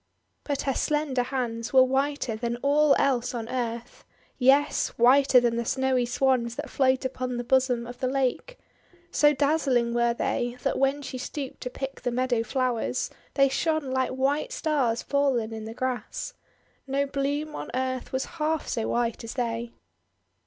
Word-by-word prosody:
But 285 -2 -2
her 270 - 0
slender 295 -2 0
hands 240 -2 -3
were 260 -1 +8
whiter 270 -2 0
than 235 +1 -3
all 290 +1 +4
else 250 -2 +1
on 225 -2 -4
earth. 235 -2 -4 0.4
Yes, 275 +3 +4
whiter 260 +2 +6
than 240 -1 +1
the 235 - 0
snowy 260 0 +1
Swans 245 -2 +1
that 295 +2 -6
float 260 -1 +2
upon 255 -1 -3
the 240 - -2
bosom 250 -1 +2
of 245 +1 -9
the 255 - 0
lake. 270 - -1 0.5
So 295 0 +5
daz 295 +2 +1
zling 240 -2 +2
were 235 0 +2
they, 240 +1 -1
that - - 0
when 275 +2 +1
she 255 -1 -6
stooped 270 +1 -6
to 250 - -4
pick 270 +2 -6
the - - -1
meadow 245 -1 0
flowers, 245 0 -1 0.2
they 275 -1 +5
shone 310 0 -1
like 260 0 +1
white 280 - 0
stars 295 - 0
fallen 265 -6 +1
in 220 -1 -6
the 225 +1 -7
grass. 255 - -3 0.5
No 275 +1 +1
bloom 285 +2 -2
on - - -6
earth 260 0 -2
was 260 0 -1 0.2
half 315 0 0
so 225 -2 -1
white 235 -1 -1
as 230 - -7
they. 235 -2 -2
260 Hz, 170 wpm, -26 LUFS, 240-275 Hz, 0.5 s, were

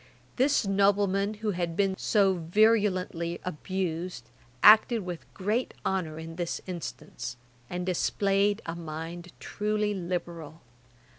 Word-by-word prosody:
This 270 -2 +3
nobleman, 200 +1 +2
who 210 - +2
has 175 -2 -1
been 190 +3 +1
so 195 -1 +3
virulently 185 -2 +1
abused, 180 -4 -3 0.4
acted 220 0 +7
with 175 -2 -7
great 215 +6 -1
honour 165 -5 -1
in 165 +1 -8
this 175 -2 -2
instance, 135 -7 -6 0.3
and 180 0 -3
displayed 200 +3 +1
a 165 - -3
mind 170 +2 -7
truly 210 0 -1
liberal. 170 -4 -5
185 Hz, 115 wpm, -28 LUFS, 170-205 Hz, 0.4 s, acted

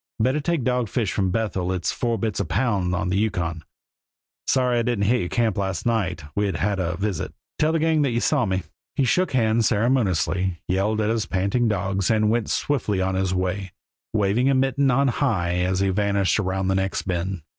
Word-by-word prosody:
Better 130 +6 +2
take 160 -2 -1
dogfish 120 -4 0
from 95 -2 0
Bethel 95 -3 -1
it's 90 -2 -1
four 120 -2 -1
bits 110 0 -2
a - - 0
pound 100 -6 0
on 90 0 -1
the 95 - +1
Yukon. 90 -7 -1 0.8
Sorry 125 -2 +2
I - - +2
didn't 115 -4 0
hit 120 +4 +3
your 90 - -2
camp 115 -5 0
last 95 -2 -2
night; 95 -9 0
we'd 100 -1 0
'a' - - -2
had 100 -1 0
a 85 -1 -1
visit. 100 -3 -3 0.2
Tell 155 +1 +3
the 165 - +1
gang 160 -1 +2
that 140 - +2
you 120 -1 0
saw 135 -2 +1
me." 95 0 -1 0.3
He 140 - +2
shook 180 +7 +1
hands 115 -2 +3
ceremoniously, 95 -6 +1
yelled 105 +4 +1
at 105 +1 +1
his 115 -2 -1
panting 100 +6 +1
dogs, 100 -2 0
and 110 -1 +3
went 115 -1 0
swiftly 110 -9 0
on 95 0 0
his 95 0 0
way, 95 0 -2 0.4
waving 110 +5 +2
a 135 - +3
mitten 135 +1 +2
on 135 +2 +3
high 100 -10 0
as 90 +1 0
he 100 - +2
vanished 100 -1 +1
around 95 -1 -1
the - - +2
next 95 0 -1
bend. 90 -1 -3
105 Hz, 205 wpm, -23 LUFS, 95-120 Hz, 0.8 s, hit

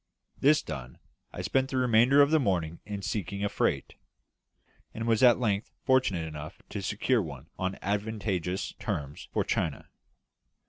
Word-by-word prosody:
This 150 +2 +4
done, 65 -2 -7 0.3
I - - -6
spent 135 0 +1
the 130 - -2
remainder 125 +3 +5
of 140 - +1
the 160 - +5
morning 85 - 0
in 100 -1 -5
seeking 100 -2 -3
a 105 - +1
freight; - - -1 1.0
and 115 - -3
was 115 -2 +2
at 125 -2 +7
length 105 -3 0 0.2
fortunate 130 -10 +2
enough 75 -1 -8
to 100 - -4
secure 110 +5 +1
one 75 -2 -8
on 95 +1 -1
advantageous 100 -3 -2
terms 75 0 -4
for - - +1
China. - - -2
105 Hz, 150 wpm, -29 LUFS, 90-125 Hz, 1.0 s, at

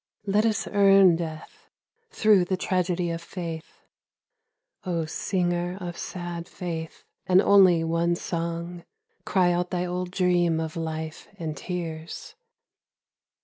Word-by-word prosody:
Let 210 +3 +3
us 215 -2 0
earn 195 -3 +6
Death 170 - -8 0.4
through 210 - +4
the 185 +1 -1
tragedy 180 -2 0
of 165 0 -4
Faith! 165 -2 -7 1.0
O 170 -4 -1
singer 175 +1 -1
of 175 -2 -5
sad 175 -1 -6
Faith 165 -3 -6 0.2
and 185 0 +6
only 190 -4 +6
one 165 +1 +1
song, 170 +1 -4 0.2
— 180 - -46
Cry 185 -4 +3
out 175 0 0
thy 180 -1 -1
old 180 0 -3
dream 175 -3 +2
of 160 -1 -4
life 160 -1 -5
and 160 -2 -4
tears 170 - -6
175 Hz, 125 wpm, -26 LUFS, 165-185 Hz, 1.0 s, earn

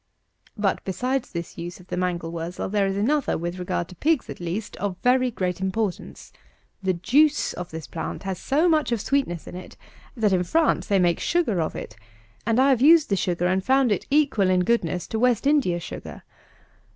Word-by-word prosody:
But, 200 -2 0
besides 250 +7 -2
this 170 0 -6
use 175 +2 -6
of 180 - -15
the - - -2
mangel 175 -2 -2
wurzel, 170 +2 -4
there 200 -1 +1
is 195 0 -2
another, 280 +7 +1
with 175 +2 -4
regard 175 -1 -2
to 185 - -11
pigs 310 - 0
at - - -9
least, 180 +5 -4
of 195 -2 -3
very 255 0 +3
great 185 -5 -3
importance. 190 0 -3 0.5
The 190 -1 0
juice 290 - +2
of 180 0 -6
this 160 -2 -7
plant 160 - -6
has 190 -2 -4
so 305 +6 +2
much 310 -6 +2
of 235 - +1
sweetness 200 - -1
in - - -9
it, 185 - -10 0.4
that, 215 -4 +2
in 180 -1 +2
France, 320 - +1
they 200 - +3
make 175 -2 +2
sugar 295 - +1
of 155 - -3
it; 110 - -7 0.5
and 230 0 +2
have 260 -2 +4
used 315 +2 +6
the 200 - +2
sugar, 175 -2 -1
and 185 +1 +1
found 265 -1 +3
it 205 - -1
equal 275 -10 +3
in 180 -1 +3
goodness 180 -5 0
to 220 - -3
West 245 0 +2
India 275 -12 +2
sugar. - - -8
195 Hz, 200 wpm, -24 LUFS, 180-260 Hz, 0.5 s, used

